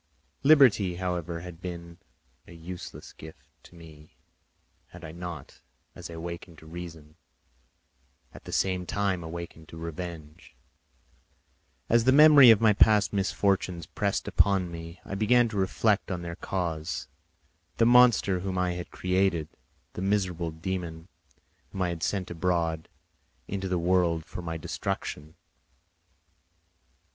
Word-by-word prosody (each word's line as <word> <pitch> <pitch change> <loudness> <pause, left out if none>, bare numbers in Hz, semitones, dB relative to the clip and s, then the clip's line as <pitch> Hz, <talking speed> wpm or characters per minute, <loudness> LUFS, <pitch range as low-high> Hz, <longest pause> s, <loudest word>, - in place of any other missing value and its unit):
Liberty, 130 - +5
however, 85 -2 -3
had 90 -1 -10
been 85 -2 -8 0.5
a - - -12
useless 85 +2 -9
gift 80 0 -13 0.2
to - - -18
me, 80 -2 -15 0.7
had - - -12
I 80 - -8
not, 85 -3 -8 0.3
as - - -9
I 85 - -8
awakened 85 0 -7
to 80 - -15
reason, 80 -2 -10 1.2
at - - -13
the - - -8
same 90 -2 0
time 100 -4 -1
awakened 80 -1 -8
to 80 - -10
revenge. 80 -2 -8 1.3
As 115 0 +3
the 130 - +5
memory 145 -2 +9
of 110 -1 +7 0.2
past 105 -2 +5
misfortunes 95 -3 0
pressed 100 +4 -2
upon 95 -3 +2
me, 85 +1 -9
I - - -7
began 115 +4 +3
to 110 - -5
reflect 100 +2 +1
on 90 -2 -4
their 85 0 -5
cause—the 85 - -5
monster 120 -6 +5
whom 95 0 -3
I 90 -1 +1
had 90 0 -6
created, 90 -4 0 0.4
the - - -6
miserable 95 -4 -1
dæmon 85 0 -5 0.6
whom 95 - -2
I 90 - 0
had 85 -2 -5
sent 95 -1 -2
abroad 85 -2 -1 0.6
into 95 -1 -3
the 90 -1 0
world 85 -2 +1
for - - -7
my 80 -1 -4
destruction. 80 -1 -5
90 Hz, 130 wpm, -27 LUFS, 80-95 Hz, 1.3 s, memory